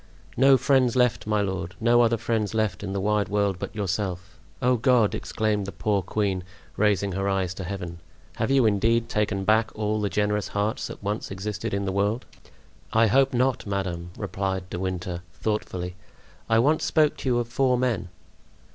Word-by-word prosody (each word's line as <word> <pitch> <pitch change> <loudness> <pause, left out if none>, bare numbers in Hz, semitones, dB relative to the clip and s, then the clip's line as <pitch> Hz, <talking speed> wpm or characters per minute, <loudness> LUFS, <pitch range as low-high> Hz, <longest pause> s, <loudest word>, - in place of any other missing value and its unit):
"No 135 +2 +6
friends 130 -1 +3
left, 125 -4 +2
my 105 -1 +2
lord; 95 -3 -3
no 120 +1 +4
other 115 0 +3
friends 110 -2 -1
left 110 -5 0
in 95 - -4
the 100 - -2
wide 105 +1 +1
world 100 -2 0
but - - -6
yourself! 95 -2 -3 0.2
Oh, 125 +1 +3
God!" 120 -2 +3
exclaimed 105 -3 -1
the - - -4
poor 105 -1 0
queen, 95 -1 -1 0.3
raising 100 -1 +2
her 95 +2 -1
eyes 95 -2 0
to 95 - -6
Heaven, 90 -2 -5 0.4
"have - - 0
You 135 -3 +4
indeed 115 +3 +2
taken 105 -2 0
back 110 +2 +3
all 105 0 -1
the 100 - 0
generous 105 +2 0
hearts 105 +2 -1
that - - -10
once 105 +2 -2
existed 105 +3 -4
in 100 0 -1
the 95 - -1
world?" 100 +5 0 0.7
"I 115 +1 +4
hope 135 +5 +4
not, 125 -3 0
madame," 90 -3 -3
replied 95 -2 -3
De 90 - -3
Winter, 90 -1 -3
thoughtfully; 90 -4 -3 0.5
"I 110 - +4
once 145 +7 +3
spoke 155 -2 +3
to 130 - -3
you 120 - +2
of 120 -1 -1
four 125 +1 +2
men." 120 -7 -1
105 Hz, 180 wpm, -25 LUFS, 95-115 Hz, 0.7 s, No